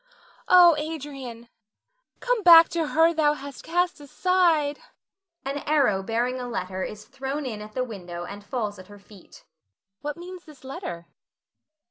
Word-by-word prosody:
Oh, 350 -2 +7
Adrian, 275 -6 -7 0.7
come - - 0
back 335 -3 +9
to 330 -2 -1
her 325 +2 +3
thou 300 -2 +3
hast 280 -2 -9
cast 350 0 0
aside. 315 -1 +1 0.7
[An 275 +1 -3
arrow 275 -11 +2
bearing 240 +5 -1
a 245 - -5
letter 185 -4 -4
is 210 +2 -6
thrown 270 +2 -5
in 220 -5 -5
at 215 0 -11
the 255 - 0
window 180 -7 -7
and 200 +3 -9
falls 210 -2 -4
at 185 - -12
her 205 - -13
feet.] 200 -1 -17 0.6
What 295 +2 -5
means 360 +1 -10
this 300 -4 -16
letter? 175 -10 -7
275 Hz, 150 wpm, -25 LUFS, 215-320 Hz, 0.7 s, back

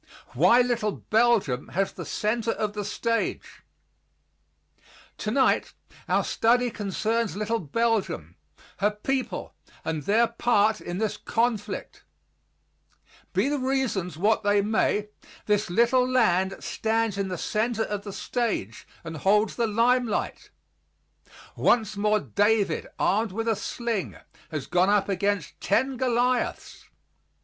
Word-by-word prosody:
WHY 245 +1 +5
LITTLE 235 -4 0 0.2
BELGIUM 215 - +2
HAS 195 +2 0
THE - - -8
CENTER 225 +2 -1
OF 210 -1 -2
THE 210 -1 -3
STAGE 230 +3 -2 1.6
Tonight - - +1 0.4
our - - +3
study 245 +1 +2
concerns 220 +2 -1
little 215 +3 -1
Belgium, 190 - -1 0.4
her 205 - +2
people, 255 +6 -3 0.3
and 160 -1 -2
their 215 +7 +3
part 220 -2 +2
in 175 - -5
this 215 +1 -1
conflict. 230 -3 -2 1.3
Be - - +2
the 290 0 0
reasons 255 - -1
what 210 +5 +2
they 205 0 +2
may, 210 0 +1 0.4
this 210 -2 +1
little 240 +6 +3
land 195 -7 +2
stands 225 -1 -1
in 200 -1 -2
the 180 -1 -4
center 220 +5 -1
of 205 -2 -4
the 200 - -6
stage 210 - -3 0.2
and 165 -1 -6
holds 210 +6 +2
the 235 -1 +1
limelight. 235 +1 0 1.1
Once 220 -3 +2
more 210 +1 +2
David, 205 -3 +1
armed 215 +2 +1
with 225 +4 -3
a 225 - +2
sling, 230 -2 -3 0.3
has 155 -4 -4
gone 180 +2 +2
up 205 -1 +2
against 200 -4 -1
ten 260 +6 +1
Goliaths. 250 0 -1
215 Hz, 120 wpm, -26 LUFS, 200-235 Hz, 1.6 s, WHY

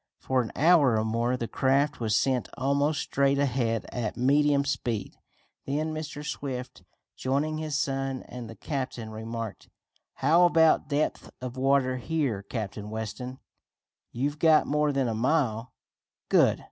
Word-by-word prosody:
For 130 -1 0
an 115 - -5
hour 150 -7 +5
or 110 - 0
more 115 +3 0
the 115 - -3
craft 140 +4 +1
was 110 -3 +1
sent 130 -3 0
almost 140 +2 +1
straight 140 0 +1
ahead 125 -5 0
at 115 -4 -3
medium 140 +2 +3
speed. 115 -7 -2 0.5
Then 155 +3 -1
Mr. 155 -1 -6
Swift, 130 -4 -5 0.3
joining 145 +4 -1
his 155 -3 -2
son 135 -1 -2
and 120 -2 -8
the 115 - -9
captain, 125 -4 -4
remarked: 115 0 -6 0.5
"How 165 +6 +5
about 160 -2 +4
depth 145 +1 -1
of 125 -1 -6
water 130 -1 +2
here, 135 -7 -1
Captain 105 0 -5
Weston?" 110 +4 -5 0.7
"You've 145 +5 -2
got 160 -1 +5
more 150 0 +1
than 135 -2 0
a 115 - -1
mile." 125 -1 0 0.6
"Good! - - +4
135 Hz, 145 wpm, -27 LUFS, 115-145 Hz, 0.7 s, hour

